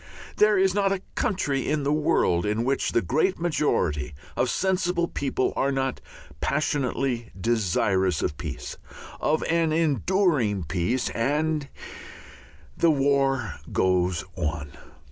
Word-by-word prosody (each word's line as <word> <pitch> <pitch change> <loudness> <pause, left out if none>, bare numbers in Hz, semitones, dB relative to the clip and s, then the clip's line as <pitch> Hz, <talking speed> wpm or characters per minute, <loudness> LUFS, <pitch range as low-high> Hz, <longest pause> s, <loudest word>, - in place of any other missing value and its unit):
There 210 -1 +5
is 190 0 +3
not 200 -1 +2
a 195 -1 -2
country 150 - -1
in 150 -1 0
the 145 +1 +1
world 90 - +2
in 105 +2 0
which 135 +2 0
the 115 - +2
great 160 +8 +1
majority 85 - 0 0.2
of 125 - +1
sensible 180 -1 +1
people 135 -4 -1
are 140 - +1
not 135 -1 -1 0.4
passionately 135 - -1
desirous 95 -3 +1
of 75 - -1
peace, 75 -2 -6 0.4
of 155 +1 +1
an 165 -1 +1
enduring 155 - +1
peace, 90 - -1
and 150 +4 0 1.1
the 170 - +3
war 140 -2 +1
goes 90 -2 +1
on. 75 -4 -3
135 Hz, 125 wpm, -25 LUFS, 95-160 Hz, 1.1 s, There